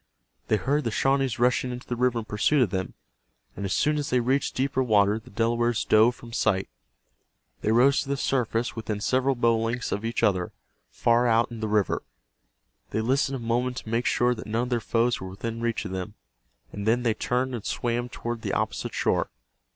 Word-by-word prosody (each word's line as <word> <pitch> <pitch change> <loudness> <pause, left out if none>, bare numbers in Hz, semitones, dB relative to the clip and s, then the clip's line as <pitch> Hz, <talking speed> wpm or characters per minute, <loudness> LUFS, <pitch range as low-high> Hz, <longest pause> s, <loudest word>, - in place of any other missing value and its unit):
They - - +3
heard 145 +6 0
the 115 - -1
Shawnees 135 +2 +1
rushing 125 +1 +2
into 125 0 -7
the 120 - -3
river 125 0 +1
in 115 - -3
pursuit 125 +7 +2
of 105 - -2
them, 95 -2 -3 0.6
and 100 - -4
as 95 - -1
soon 150 0 +2
as 145 - -3
they 125 - +2
reached 130 +4 0
deeper 130 0 0
water 105 -3 +3
the 120 +3 -16
Delawares 120 +1 0
dove 110 +3 +5
from 120 -1 -12
sight. 100 - +1 0.9
They 110 - +1
rose 130 +5 +4
to 135 - -7
the 140 - 0
surface 120 -3 0
within 110 -2 -3
several 130 +5 +1
bow 115 -1 +2
lengths 115 +2 -2
of 105 - -2
each 115 +1 -2
other, 90 -3 +1 0.4
far 120 +1 +2
out 115 +1 +3
in 115 - -7
the 110 - -2
river. 105 -3 +1 0.9
They 110 - -1
listened 135 +4 +1
a 120 -3 -6
moment 125 +2 0
to - - -7
make 115 +2 0
sure 125 0 +2
that 110 - -8
none 115 +3 0
of 125 - -4
their 120 -2 +1
foes 115 +1 0
were 95 - -6
within 115 +4 -5
reach 115 -2 -1
of 100 - -5
them, 95 +2 -5 0.6
and 100 +1 -5
then 120 +2 +2
they 115 -2 +2
turned 125 +3 -1
and 115 -4 -4
swam 120 0 -2
toward 120 -1 -5
the - - -3
opposite - - -2
shore. - - +1
120 Hz, 210 wpm, -26 LUFS, 110-125 Hz, 0.9 s, dove